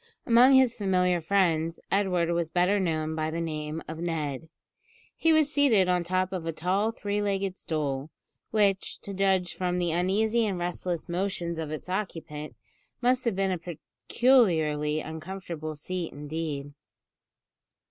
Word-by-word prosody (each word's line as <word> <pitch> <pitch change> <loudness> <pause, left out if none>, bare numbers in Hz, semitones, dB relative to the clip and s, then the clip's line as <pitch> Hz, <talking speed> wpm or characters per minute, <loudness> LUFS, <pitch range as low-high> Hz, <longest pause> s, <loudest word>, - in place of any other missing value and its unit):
Among 245 +3 +6
his 260 -3 +5
familiar 180 -4 +1
friends 165 -2 +1
Edward 180 -4 +1
was 170 -1 0
better 180 +4 +2
known 160 -4 -1
by 155 0 -1
the 165 +1 -3
name 155 -1 -4
of 160 0 -6
Ned. 160 -3 -3 0.7
He 325 - +2
was 310 -1 +3
seated 235 -10 +4
on 180 -1 +2
the 170 - -9
top 185 0 0
of 175 -3 -4
a - - 0
tall 185 +7 0
three 205 -2 -2
legged 195 -2 -1
stool, 145 -4 -3 0.4
which, 200 -3 +1
to 200 - -7
judge 190 -2 +1
from 180 -1 -1
the 175 -2 0
uneasy 210 +7 +2
and 195 -3 -2
restless 175 -1 -3
motions 175 -2 -2
of 160 -2 -4
its 155 +2 -6
occupant, 165 -6 -4 0.4
must 250 +1 +2
have 230 -5 +1
been 195 0 +1
a 180 - -2
peculiarly 160 - +1
uncomfortable 160 -1 -6
seat 175 +3 -4
indeed. 145 -1 -5
180 Hz, 150 wpm, -27 LUFS, 160-195 Hz, 0.7 s, Among